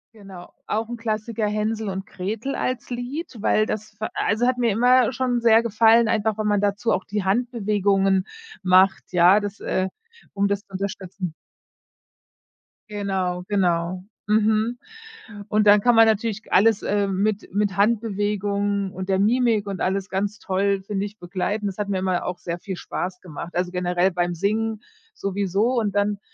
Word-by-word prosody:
Genau. 195 -4 -12
Auch 220 +1 -2
'n 240 - -5
Klassiker 220 -1 -2
„Hänsel 215 0 -1
und 190 0 -4
Gretel” 215 +8 -4
als 255 -1 -3
Lied, 250 +5 -5
weil 215 0 +3
das 215 0 -4
hat 205 - -33
ver 215 - -3
also, 225 +4 +1
hat 255 -1 +1
mir 235 -3 +2
immer 250 +3 +4
schon 250 -2 -1
sehr 225 -1 +6
gefallen, 230 +1 +4
einfach 220 -1 0
wenn 215 -1 -1
man 205 -1 +2
dazu 205 +2 0
auch 190 - -1
die 205 -2 -3
Handbewegungen 200 -4 +1 0.4
macht, 185 +1 +3
ja, 180 +4 +5
das, 205 +1 -5
äh 185 0 -1 0.4
um 200 0 +1
das 200 0 -1
zu 200 - -32
unterstützen. 190 -2 -5 1.6
Genau, 190 -3 -2
genau, 180 -2 0 0.2
mhm, 220 +2 +2 0.7
und 210 0 +2
dann 205 0 +7
kann 245 0 +4
man 225 0 +8
natürlich 220 0 0
alles, 215 +2 +4
äh, 200 -1 +1
mit 200 +1 -1
mit 200 -1 0
Handbewegungen 205 -2 0
und 190 0 -7
der 190 - +3
Mimik 225 0 +2
und 195 -2 -5
alles 190 +1 -1
ganz 200 +2 -2
toll, 195 0 0
finde 200 0 -2
ich, 210 +1 -9
begleiten. 195 +4 -3
Das 195 +1 -4
hat 205 -1 -2
mir 195 - 0
immer 185 -1 -1
auch 180 0 -3
sehr 170 0 -5
viel 190 0 -5
Spaß 180 +1 -5
gemacht. 170 0 -8
Also, 180 0 -1
generell 180 +1 +1
beim 175 0 -1
Singen 215 +4 -1 0.3
sowieso 200 +5 0
und 205 -2 -2
dann 205 0 +1
205 Hz, 170 wpm, -23 LUFS, 190-220 Hz, 1.6 s, man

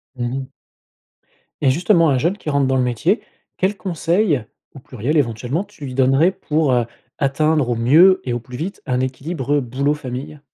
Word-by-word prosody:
Mmh 120 -1 -2
mh. 135 -1 -4 1.2
Et 135 - +4
justement, 165 +2 +3
un 135 - +2
jeune 170 +10 0
qui 155 - -6
rentre 140 -2 +2
dans 130 - +1
le 130 - +2
métier, 145 - 0 0.4
quels 195 +2 0
conseils- 170 - 0 0.3
au - - -9
pluriel 125 +3 -3
éventuellement- 125 - -1
tu 205 -8 -11
lui 130 - -6
donnerais 135 +7 +4
pour, 150 -6 0
heu, 120 -2 +2 0.3
atteindre 145 -1 +1
au 120 - +1
mieux 160 +12 +5
et 125 - -1
au 120 - -2
plus 125 +1 -10
vite 180 +7 -5
un 125 -3 0
équilibre, 135 +2 -2
heu, 145 - +2
boulot- 135 +4 0
famille? 140 +1 -7
140 Hz, 190 wpm, -20 LUFS, 125-165 Hz, 1.2 s, mieux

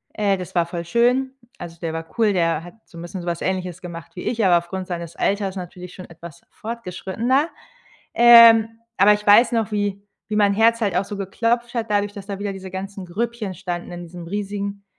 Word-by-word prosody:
äh, 200 -2 +1
das 180 -1 -8
war 170 -1 +3
voll 170 0 -6
schön. 245 +7 +2 0.3
Also, 170 -1 -8
der 165 -2 -2
war 165 0 -5
cool, 220 -2 +3
der 165 -3 +1
hat 175 - -11
so 170 - -15
'n - - -7
bisschen 175 +2 -7
so 175 - -9
was 170 -1 -2
Ähnliches 180 -2 -3
gemacht 170 -1 -9
wie 180 - -7
ich, 230 -3 0
aber 175 -2 +5
aufgrund 185 +2 -5
seines 170 -2 -6
Alters 195 -1 0
natürlich 180 0 -8
schon 185 - -10
etwas 170 -2 -12
fortgeschrittener. 230 - -2 0.6
Ähm, 230 -2 +8 0.3
aber 200 +2 +6
ich 210 0 -4
weiß 220 +5 +7
noch, 225 -2 0
wie 205 -1 -2 0.3
wie 215 - -2
mein 205 -1 +4
Herz 230 +2 +3
halt 205 -3 0
auch 195 - +1
so 205 - -7
geklopft 230 +5 -1
hat 225 -2 -2
dadurch, 205 0 0
dass 200 -2 -10
da 200 -1 -5
wieder 205 -1 -3
diese 190 -1 -9
ganzen 195 +1 -6
Grüppchen 215 +2 -3
standen 175 -2 -5
in 175 0 -7
diesem 175 0 -10
riesigen 200 +1 -4
195 Hz, 210 wpm, -22 LUFS, 175-215 Hz, 0.6 s, Ähm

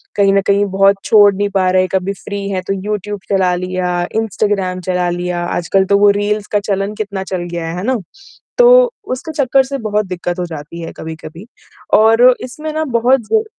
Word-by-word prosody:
कहीं 195 -1 +3
न 195 - +3
कहीं 200 +1 +3
बहुत 195 0 +5
छोड़ 205 -2 +6
नहीं 205 +1 -1
पा 190 -2 +1
रहे 185 0 +3
हैं। 185 - -1
कभी 190 +1 0
फ्री 200 +1 -6
हैं 185 -2 -2
तो 195 - 0
यूट्यूब 205 +1 -4
चला 190 -2 +2
लिया, 180 -1 -2
इंस्टाग्राम 205 -4 -1
चला 180 0 -1
लिया, 175 0 -3
आजकल 175 +3 0
तो 200 +1 +3
वो 205 0 +5
रील्स 210 0 -1
का 205 - +2
चलन 200 +1 -1
कितना 200 -3 -4
चल 185 -2 -4
गया 170 -1 -4
है, 165 - -5
है 180 - -4
ना? 255 +2 0 0.6
तो - - +6 0.2
उसके 315 +5 -6
चक्कर 265 +1 +3
से 275 +1 -5
बहुत 210 -3 -1
दिक्कत 175 0 -4
हो 175 - -1
जाती 165 +1 -8
है 165 - -6
कभी-कभी। 160 +3 -9 0.5
और 225 +3 +6
इसमें 305 +5 -6
ना 315 0 -1 0.2
बहुत 250 +2 +3
ज 440 0 +2
195 Hz, 205 wpm, -16 LUFS, 180-215 Hz, 0.6 s, छोड़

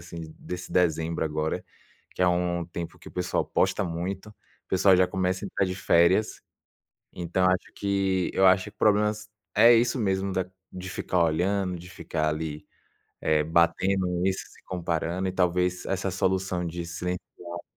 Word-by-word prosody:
assim, 85 -2 -9
desse 90 0 -7
dezembro 80 -2 +1
agora, 75 0 -2 0.5
que - - -8
é 90 - +5
um 90 -1 0
tempo 85 -1 -6
que - - -12
o - - -13
pessoal 90 0 -1
posta - - +1
muito. 90 +4 -4
O 105 - -28
pessoal 95 +1 +5
já 90 0 +4
começa 95 0 -1
a - - -3
entrar 95 - 0
de 90 - -3
férias, 95 +2 +3 0.7
então 90 +1 0
acho 90 0 0
que 95 -2 0
eu 95 - +5
acho 95 0 +5
que 105 - -9
problemas 105 +1 +2 0.3
é 115 +3 +8
isso 120 +3 +2
mesmo 95 -3 0
da 95 0 0 0.3
de 95 0 -7
ficar 90 0 0
olhando, 90 +3 0
de 90 - -11
ficar 80 -3 -2
ali, 75 -1 -4 0.6
eh, 80 -1 +3
batendo 90 +3 +2
isso, 95 0 0
se - - -19
comparando 85 +1 -2
e - - -3
talvez 90 0 +1
essa 95 0 -1
solução 95 -1 0
de 85 +1 -5
silenciar 90 +1 -3 0.2
um - - -11
pouco 85 0 -7
90 Hz, 170 wpm, -27 LUFS, 85-95 Hz, 0.7 s, é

